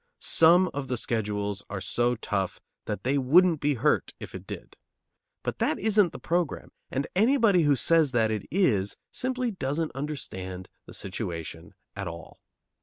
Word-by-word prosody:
Some 175 Hz, +3 st, +5 dB
of 140 Hz, -1 st, -4 dB
the 125 Hz, -, -1 dB
schedules 105 Hz, -3 st, -2 dB
are 100 Hz, -, -4 dB
so 120 Hz, +5 st, 0 dB
tough 105 Hz, -4 st, -2 dB, 0.3 s
that 105 Hz, -, -4 dB
they 140 Hz, +3 st, +2 dB
wouldn't 165 Hz, +4 st, +4 dB
be 145 Hz, -1 st, +2 dB
hurt, 115 Hz, -, +1 dB
if -, -, -9 dB
it -, -, -9 dB
did. -, -, -8 dB, 0.7 s
But -, -, -3 dB
that -, -, +1 dB
isn't 205 Hz, -4 st, +3 dB
the -, -, -8 dB
program, 170 Hz, -3 st, -2 dB, 0.2 s
and 135 Hz, +1 st, -1 dB
anybody 220 Hz, -3 st, +4 dB
who 145 Hz, -3 st, +4 dB
says 160 Hz, +1 st, +3 dB
that 110 Hz, -3 st, +2 dB
it 105 Hz, -2 st, -3 dB
is 110 Hz, -, +1 dB
simply 255 Hz, -1 st, -2 dB
doesn't 155 Hz, -3 st, -2 dB
understand 95 Hz, -11 st, -6 dB, 0.2 s
the -, -, -10 dB
situation 90 Hz, -2 st, -6 dB, 0.2 s
at 100 Hz, -2 st, -4 dB
all. 85 Hz, 0 st, -9 dB
130 Hz, 160 wpm, -27 LUFS, 105-170 Hz, 0.7 s, Some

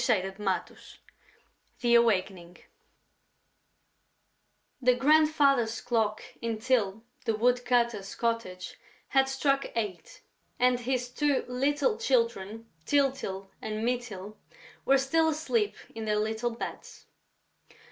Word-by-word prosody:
CHAPTER 195 Hz, -5 st, +1 dB
X 190 Hz, -3 st, -3 dB, 0.8 s
THE 240 Hz, -2 st, +2 dB
AWAKENING 190 Hz, -6 st, +2 dB, 2.2 s
The 250 Hz, 0 st, +4 dB
grandfather's 280 Hz, -5 st, +3 dB
clock 220 Hz, -3 st, 0 dB, 0.2 s
in 230 Hz, -1 st, -2 dB
Tyl 225 Hz, -3 st, 0 dB, 0.2 s
the 225 Hz, -, +1 dB
woodcutter's 240 Hz, -3 st, +1 dB
cottage 230 Hz, -6 st, -3 dB, 0.3 s
had 270 Hz, -1 st, +3 dB
struck 275 Hz, +1 st, +1 dB
eight; 230 Hz, -, -4 dB, 0.4 s
and 250 Hz, 0 st, +3 dB
his 250 Hz, 0 st, -1 dB
two 285 Hz, +2 st, 0 dB
little 290 Hz, -, 0 dB
Children, 230 Hz, -3 st, 0 dB, 0.2 s
Tyltyl 255 Hz, -, 0 dB
and 215 Hz, +1 st, -3 dB
Mytyl, 215 Hz, -5 st, -4 dB, 0.5 s
were 275 Hz, -, +5 dB
still 320 Hz, +4 st, +2 dB
asleep 405 Hz, +8 st, 0 dB, 0.2 s
in 225 Hz, -1 st, -5 dB
their 210 Hz, -1 st, +1 dB
little 220 Hz, +3 st, -1 dB
beds. 230 Hz, 0 st, -8 dB
240 Hz, 100 wpm, -29 LUFS, 215-270 Hz, 2.2 s, were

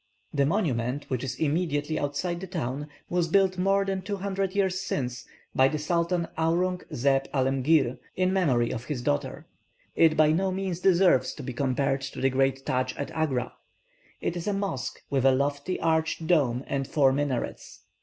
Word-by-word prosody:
The 140 Hz, -1 st, +2 dB
monument, 140 Hz, -, 0 dB
which 130 Hz, -1 st, -1 dB
is 130 Hz, -2 st, -3 dB
immediately 155 Hz, 0 st, 0 dB
outside 170 Hz, +5 st, -2 dB
the 190 Hz, -, -6 dB
town, 145 Hz, -5 st, -3 dB, 0.2 s
was 175 Hz, -1 st, 0 dB
built 185 Hz, +1 st, +2 dB
more 195 Hz, +1 st, +2 dB
than 195 Hz, -1 st, -2 dB
two 200 Hz, +2 st, -3 dB
hundred 195 Hz, 0 st, -2 dB
years 190 Hz, -2 st, +1 dB
since 125 Hz, -9 st, -3 dB, 0.3 s
by 130 Hz, -, +5 dB
the 155 Hz, -, -1 dB
Sultan 170 Hz, +2 st, 0 dB
Aurung 180 Hz, +3 st, +1 dB
zeb 135 Hz, +2 st, +2 dB
Alemgir, 135 Hz, 0 st, +2 dB, 0.2 s
in 185 Hz, 0 st, +1 dB
memory 130 Hz, -11 st, +2 dB
of 115 Hz, -, -5 dB
his 135 Hz, -5 st, -4 dB
daughter. 70 Hz, -, -2 dB, 0.5 s
It 160 Hz, -1 st, +4 dB
by 155 Hz, 0 st, +5 dB
no 190 Hz, +4 st, +1 dB
means 185 Hz, -2 st, -3 dB
deserves 180 Hz, -6 st, +4 dB
to -, -, -8 dB
be 125 Hz, -, -5 dB
compared 135 Hz, +1 st, 0 dB
to 135 Hz, -, -6 dB
the 135 Hz, 0 st, +2 dB
great 135 Hz, +1 st, +1 dB
Tadsch 130 Hz, 0 st, -1 dB
at 140 Hz, -, -4 dB
Agra. 135 Hz, -6 st, -1 dB, 0.7 s
It 170 Hz, -, -2 dB
is 175 Hz, +1 st, -5 dB
a 205 Hz, -, +1 dB
mosque, 195 Hz, -, -3 dB
with 135 Hz, -2 st, +1 dB
a 135 Hz, -, +6 dB
lofty 140 Hz, +6 st, -1 dB
arched 160 Hz, 0 st, 0 dB
dome 140 Hz, -7 st, +2 dB
and 135 Hz, -1 st, -2 dB
four 140 Hz, -3 st, +3 dB
minarets. 140 Hz, -3 st, -3 dB
150 Hz, 175 wpm, -27 LUFS, 135-180 Hz, 0.7 s, a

